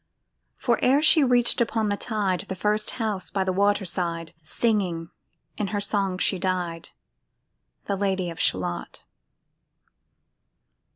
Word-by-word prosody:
For 240 Hz, -3 st, +1 dB
ere 275 Hz, +4 st, +4 dB
she 310 Hz, -1 st, +6 dB
reached 245 Hz, -2 st, +3 dB
upon 225 Hz, -2 st, +1 dB
the 205 Hz, -, +1 dB
tide 200 Hz, -4 st, -1 dB
The 190 Hz, -, -4 dB
first 210 Hz, +3 st, 0 dB
house 215 Hz, -5 st, -2 dB
by 195 Hz, -, 0 dB
the 190 Hz, 0 st, -1 dB
water 200 Hz, +1 st, +2 dB
side, 170 Hz, -2 st, -2 dB
Singing 175 Hz, -2 st, -1 dB, 0.5 s
in 210 Hz, -, 0 dB
her 205 Hz, +1 st, -2 dB
song 200 Hz, -2 st, 0 dB
she 190 Hz, 0 st, +1 dB
died, 180 Hz, -3 st, -2 dB, 1.0 s
The 200 Hz, -, -1 dB
Lady 190 Hz, -3 st, -1 dB
of 165 Hz, -, -10 dB
Shalott. 90 Hz, -2 st, -1 dB
195 Hz, 130 wpm, -25 LUFS, 180-215 Hz, 1.0 s, she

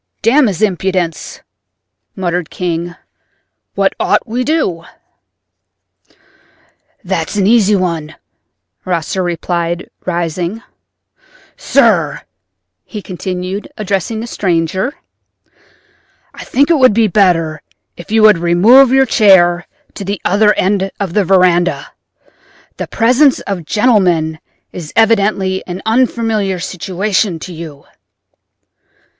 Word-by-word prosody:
"Damn 255 Hz, +4 st, +4 dB
his 200 Hz, +1 st, -2 dB
impudence!" 185 Hz, -4 st, -2 dB, 0.7 s
muttered 175 Hz, -3 st, -3 dB
King—"what 175 Hz, 0 st, -5 dB
ought -, -, +1 dB
we 235 Hz, +1 st, -4 dB
to 255 Hz, -, -1 dB
do?" 185 Hz, -, -1 dB, 2.2 s
"That's -, -, -3 dB
an 200 Hz, -2 st, +1 dB
easy 210 Hz, -1 st, +4 dB
one," 165 Hz, -5 st, -3 dB, 0.7 s
Rosser 180 Hz, +1 st, -2 dB
replied, 175 Hz, 0 st, -3 dB
rising. 175 Hz, +4 st, -3 dB, 0.9 s
"Sir," -, -, +1 dB, 0.6 s
he 210 Hz, -3 st, -9 dB
continued, 185 Hz, +1 st, -5 dB
addressing 210 Hz, +1 st, -2 dB
the -, -, -5 dB
stranger, 190 Hz, -, -1 dB, 1.4 s
"I -, -, -10 dB
think 285 Hz, +5 st, +1 dB
it 320 Hz, -, +3 dB
would 255 Hz, -6 st, +5 dB
be 225 Hz, -1 st, +3 dB
better 165 Hz, -6 st, +1 dB, 0.3 s
if 175 Hz, -, -12 dB
you 220 Hz, 0 st, +2 dB
would 210 Hz, -5 st, +6 dB
remove 205 Hz, +11 st, +5 dB
your 270 Hz, 0 st, +4 dB
chair 185 Hz, -7 st, +4 dB, 0.3 s
to -, -, -7 dB
the 200 Hz, 0 st, -4 dB
other 210 Hz, +2 st, +3 dB
end 195 Hz, 0 st, 0 dB
of 195 Hz, -4 st, -3 dB
the 210 Hz, -, +2 dB
veranda. 180 Hz, -1 st, +2 dB, 0.9 s
The -, -, -5 dB
presence 255 Hz, +4 st, +3 dB
of 185 Hz, -5 st, -5 dB
gentlemen 180 Hz, -8 st, +1 dB, 0.3 s
is 165 Hz, -4 st, -8 dB
evidently 200 Hz, -4 st, +2 dB
an 180 Hz, 0 st, -5 dB
unfamiliar 225 Hz, -4 st, 0 dB
situation 185 Hz, +1 st, -2 dB
to 175 Hz, +3 st, -9 dB
you." 155 Hz, -4 st, -10 dB
190 Hz, 105 wpm, -14 LUFS, 175-215 Hz, 2.2 s, would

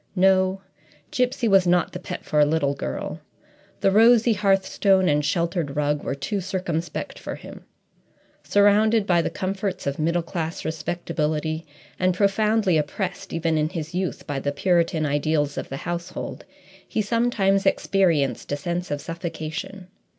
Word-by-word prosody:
No; 190 Hz, 0 st, +3 dB, 0.5 s
Gipsy 250 Hz, -4 st, 0 dB
was 195 Hz, -3 st, +5 dB
not 175 Hz, 0 st, +3 dB
the 180 Hz, -, -6 dB
pet -, -, -7 dB
for 150 Hz, -, +1 dB
a -, -, +7 dB
little 145 Hz, -2 st, +1 dB
girl. 65 Hz, -, -5 dB, 0.6 s
The 195 Hz, -, +4 dB
rosy 230 Hz, +2 st, +6 dB
hearthstone 195 Hz, -1 st, +2 dB
and 150 Hz, -1 st, +2 dB
sheltered 170 Hz, -1 st, -1 dB
rug 150 Hz, 0 st, 0 dB
were 135 Hz, -, -2 dB
too 195 Hz, +9 st, -3 dB
circumspect 180 Hz, -3 st, -3 dB
for -, -, -5 dB
him. -, -, -12 dB, 0.8 s
Surrounded 210 Hz, +2 st, +4 dB
by 175 Hz, -3 st, +3 dB
the -, -, -1 dB
comforts 195 Hz, 0 st, -3 dB
of 140 Hz, +1 st, -2 dB
middle 170 Hz, +2 st, +1 dB
class 165 Hz, -1 st, -4 dB
respectability, 160 Hz, -1 st, -2 dB, 0.3 s
and 185 Hz, -1 st, +2 dB
profoundly 205 Hz, -2 st, +2 dB
oppressed, 180 Hz, +5 st, -4 dB
even 165 Hz, -1 st, 0 dB
in 155 Hz, 0 st, +1 dB
his 165 Hz, -2 st, -5 dB
youth, 185 Hz, 0 st, -3 dB
by 145 Hz, -2 st, -3 dB
the 140 Hz, +1 st, -1 dB
Puritan 165 Hz, 0 st, +1 dB
ideals 145 Hz, 0 st, 0 dB
of -, -, -5 dB
the 135 Hz, -, -4 dB
household, 175 Hz, +3 st, -5 dB, 0.4 s
he 215 Hz, -, -1 dB
sometimes 205 Hz, -3 st, +1 dB
experienced 155 Hz, -, +1 dB
a 145 Hz, -, 0 dB
sense 175 Hz, +3 st, -3 dB
of 145 Hz, 0 st, -2 dB
suffocation. 170 Hz, +2 st, -6 dB
175 Hz, 150 wpm, -24 LUFS, 155-195 Hz, 0.8 s, a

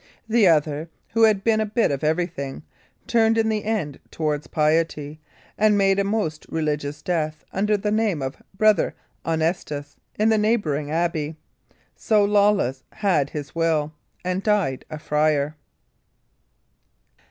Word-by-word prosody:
The 225 Hz, -3 st, +4 dB
other, 155 Hz, -1 st, +2 dB, 0.2 s
who 230 Hz, -, 0 dB
had 210 Hz, -3 st, +2 dB
been 220 Hz, 0 st, +3 dB
a -, -, +1 dB
bit 220 Hz, -2 st, +1 dB
of 140 Hz, 0 st, -3 dB
everything, 155 Hz, -4 st, -2 dB, 0.4 s
turned 225 Hz, -1 st, +3 dB
in 220 Hz, 0 st, +2 dB
the 215 Hz, -1 st, -1 dB
end 200 Hz, -11 st, -2 dB
towards 150 Hz, -2 st, -2 dB
piety, 155 Hz, -1 st, 0 dB, 0.4 s
and 210 Hz, -1 st, +4 dB
made 195 Hz, 0 st, +3 dB
a -, -, +3 dB
most 195 Hz, -7 st, -2 dB
religious 150 Hz, -2 st, -2 dB
death 155 Hz, -3 st, -2 dB
under 210 Hz, +2 st, +1 dB
the 210 Hz, +1 st, -2 dB
name 215 Hz, -6 st, +1 dB
of 130 Hz, 0 st, -5 dB, 0.2 s
Brother 215 Hz, -1 st, +3 dB, 0.3 s
Honestus 160 Hz, -3 st, -2 dB, 0.2 s
in 215 Hz, +1 st, +3 dB
the 220 Hz, -1 st, +3 dB
neighbouring 170 Hz, -10 st, 0 dB
abbey. 160 Hz, -1 st, -1 dB, 0.6 s
So 210 Hz, -2 st, +2 dB
Lawless 200 Hz, -10 st, +2 dB
had 170 Hz, -9 st, +1 dB
his 145 Hz, -2 st, -6 dB
will, 160 Hz, -2 st, 0 dB, 0.3 s
and 185 Hz, +1 st, -1 dB
died 200 Hz, -11 st, 0 dB
a 155 Hz, -, -5 dB
friar. 150 Hz, 0 st, +1 dB
165 Hz, 140 wpm, -23 LUFS, 150-210 Hz, 0.6 s, The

